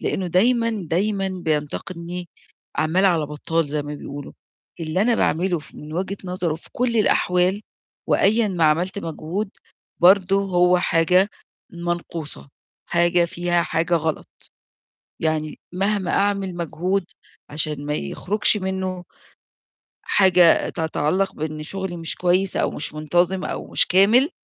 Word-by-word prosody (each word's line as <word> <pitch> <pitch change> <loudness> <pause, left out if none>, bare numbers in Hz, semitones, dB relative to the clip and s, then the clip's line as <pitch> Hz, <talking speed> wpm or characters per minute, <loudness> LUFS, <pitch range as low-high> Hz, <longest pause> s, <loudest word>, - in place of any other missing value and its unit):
لإنه 185 - -2
دايمًا، 230 +6 +2 0.2
دايمًا 195 +2 0 0.2
بينتقدني 170 +3 -3 0.5
عَمّال 160 +5 +2
على 170 -6 +3
بطّال 150 +2 -2
زي 150 +1 -2
ما 145 +1 -6
بيقولوا، 145 -1 -8 0.5
اللي 165 +4 0
أنا 235 +1 +3
باعمله 175 -1 +1
ف 150 - -15
من 150 +1 -10
وجهة 190 +3 -3
نظره 180 -3 -2
في 160 - -12
كل 235 -1 0
الأحوال 185 -1 +2 0.5
وأيًا 215 +2 +3
ما 175 -4 0
عملت 170 +6 +1
مجهود 180 +4 -4 0.5
برضه 190 +2 +5
هو 180 -1 +3
حاجة 180 +4 +3 0.4
منقوصة، 170 -4 -4 0.4
حاجة 175 0 +3
فيها 175 0 0
حاجة 170 +1 0
غلط، 160 -1 -1 0.9
يعني 155 -1 -1 0.2
مهما 195 0 0
أعمل 200 -2 0
مجهود 175 +3 -1 0.5
عشان 150 -1 0
ما 150 - -1
يخرُجش 210 +7 +2
منّه 190 -2 -3 1.0
حاجة 180 -4 +5
تتعلّق 170 +4 -1
بإن 155 0 -4
شُغلي 190 0 -5
مش 165 -1 -2
كويس، 185 +2 +1
أو - - +1
مش 150 - -5
منتظِم 175 +5 0
أو - - -5
مش - - +2
كامل، 215 - +5
175 Hz, 130 wpm, -22 LUFS, 160-190 Hz, 1.0 s, برضه